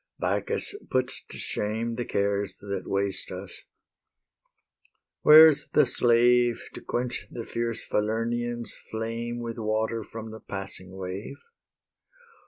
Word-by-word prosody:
Bacchus 435 - 0 0.2
puts 130 0 -1
to - - -9
shame 110 +3 -2
The 120 +1 -3
cares 100 0 0
that 100 -2 -5
waste 100 0 -1
us. 95 0 -8 1.6
Where's 155 -1 +8
the 150 - +6
slave 120 0 +4
To - - -8
quench 125 +1 -3
the 115 -2 -6
fierce 115 -1 -2
Falernian's 115 +2 -1 0.2
flame 115 +2 -3
With 115 0 -5
water 110 +1 -1
from 110 +1 -8
the 110 - -8
passing 95 -2 -7
wave? 95 +2 -6
115 Hz, 115 wpm, -27 LUFS, 100-120 Hz, 1.6 s, Where's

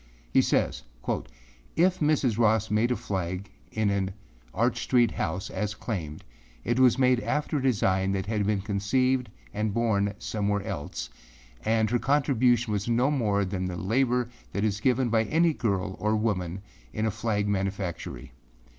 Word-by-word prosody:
He - - +6
says, - - +1 0.2
âIf - - -2 0.5
Mrs. 155 - +2
Ross 110 -1 +3
made 110 +3 +2
a 125 - +1
flag 95 -1 -4 0.2
in 110 -2 +1
an 95 -1 -1 0.4
Arch - - 0
Street 120 -3 +3
house 90 +2 -3
as 105 -1 -2
claimed, 85 -10 -5 0.4
it 120 +2 0
was 130 -2 +5
made 125 -2 +4
after 150 +3 -1
a - - -3
design 95 -7 +2
that 95 0 -1
had 105 -1 -1
been 105 -2 +1
conceived 120 +5 +1 0.2
and 105 0 -1
born 105 -3 +1
somewhere 105 -2 -1
else, 75 - -5 0.5
and 110 0 +2
her 120 - +2
contribution 125 -5 +2
was 100 +1 -2
no 125 +4 +3
more 105 -8 +1
than 95 -1 -3
the 90 -1 -3
labor 125 +5 +1 0.3
that 100 - -1
is 105 -1 0
given 125 0 +2
by 115 0 +2
any 165 +6 +3
girl 100 -6 -1
or 105 +3 +1
woman 95 -4 -1 0.3
in 110 - -2
a 110 - +1
flag 105 -1 -1
manufactory. 95 -3 -3
110 Hz, 160 wpm, -27 LUFS, 100-120 Hz, 0.5 s, He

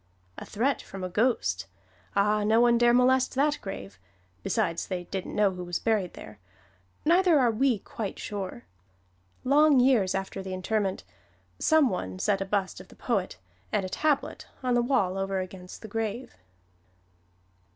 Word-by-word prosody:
A - - -8
threat 255 +6 0
from 195 -1 -9
a 185 - -3
ghost! 175 - 0 0.5
Ah, 210 +1 +2
no 220 +2 +3
one 235 0 +4
dare 240 0 +5
molest 255 +2 +3
that 290 +2 +2
grave 100 - -8 0.4
besides 170 - -1
they 180 -2 -3
didn't 190 +1 -5
know 205 -2 +3
who 180 -1 -6
was 175 -1 -2
buried 215 -6 -1
there 105 -1 -11 0.7
neither 350 0 +5
are 245 -3 +3
we 245 +1 +2
quite 200 +1 -6
sure. 190 -11 -6 0.8
Long 290 +1 +5
years 245 -8 +3
after 195 0 -4
the 190 -1 -5
interment, 190 - -1 0.6
some 315 -3 +4
one 95 - -4
set 195 - 0
a - - -1
bust 195 -2 -2
of 185 - -15
the - - -17
poet, 200 - -2 0.3
and 205 -3 0
a - - -5
tablet, 300 +6 -1 0.2
on 250 -1 +1
the 240 - +3
wall 195 -7 +1
over 195 0 -1
against 185 +1 -8
the - - -6
grave. 225 +3 -4
205 Hz, 160 wpm, -27 LUFS, 185-245 Hz, 0.8 s, dare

